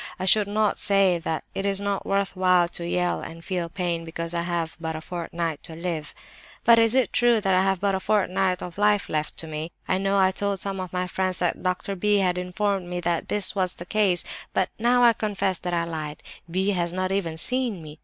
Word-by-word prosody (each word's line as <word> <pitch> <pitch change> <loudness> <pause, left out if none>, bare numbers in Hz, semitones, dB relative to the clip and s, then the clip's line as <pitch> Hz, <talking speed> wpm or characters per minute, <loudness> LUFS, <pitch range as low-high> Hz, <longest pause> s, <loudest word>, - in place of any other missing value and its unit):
I 185 - -3
should 205 +2 +5
not 210 0 +1
say 195 -3 +4
that 160 -2 -3
it 195 - -3
is 195 -1 0
not 200 -1 -2
worth 195 0 0
while 180 -1 +4
to 170 -1 -5
yell 180 0 0
and 165 0 -9
feel 180 -3 -2
pain 170 -2 -2
because 165 +1 -4
I 170 - 0
have 170 -1 -2
but 160 -1 -3
a - - -4
fortnight 170 -2 -4
to 160 - -10
live. 165 -2 -4 0.5
"But 230 -1 +7
is 225 +1 +4
it 260 -2 +2
true 240 -2 +4
that 195 -2 +1
I 185 - +4
have 190 -1 +1
but 200 0 +1
a 190 - 0
fortnight 190 -2 +1
of 180 +2 -8
life 210 -1 +3
left 155 0 -2
to 160 - -2
me? 155 +2 -4 0.2
I 185 - +1
know 195 +1 +1
I 190 -1 +4
told 200 0 -1
some 195 0 -4
of 185 -1 -5
my 180 0 -1
friends 185 0 -1
that 175 - -1
Doctor 185 +2 -2
B. 205 +2 +2
had 180 -2 +1
informed 185 +1 -1
me 180 0 -3
that 170 -1 -1
this 205 -2 +1
was 185 -2 0
the 175 - -9
case; 195 -3 +2 0.3
but 190 0 +2
I - - -12
now 240 0 +5
confess 200 -4 -1
that 175 -1 -4
I 170 - +1
lied; 155 -3 -5 0.3
B. 190 +4 0
has 175 -3 0
not 185 +1 -2
even 170 -5 -1
seen 240 -2 -1
me. 155 0 -11
185 Hz, 235 wpm, -25 LUFS, 170-200 Hz, 0.5 s, But